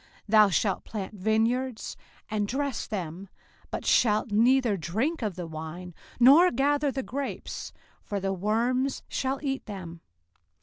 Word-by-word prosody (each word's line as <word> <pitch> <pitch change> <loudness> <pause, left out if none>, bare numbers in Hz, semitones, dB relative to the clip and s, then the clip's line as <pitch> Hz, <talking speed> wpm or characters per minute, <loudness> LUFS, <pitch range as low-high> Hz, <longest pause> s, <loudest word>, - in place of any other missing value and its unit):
05:028:039 - - -28 0.2
Thou 215 -1 +7
shalt 195 +1 0
plant 210 -2 -6
vineyards, 220 +4 0 0.3
and 210 -1 0
dress 275 +1 -2
them, 185 -1 -5 0.4
but - - -5
shalt 215 -1 +3
neither 235 +1 +4
drink 220 - -2
of 210 -5 -2
the 175 -1 -5
wine, 160 +3 -7 0.3
nor 285 +9 +8
gather 285 +2 +1
the 265 0 -3
grapes; 275 +3 -5 0.3
for 205 -2 -3
the 195 0 -1
worms 235 +7 0
shall 265 +1 -1
eat 270 -1 -2
them. 175 -5 -8
220 Hz, 140 wpm, -27 LUFS, 195-265 Hz, 0.4 s, nor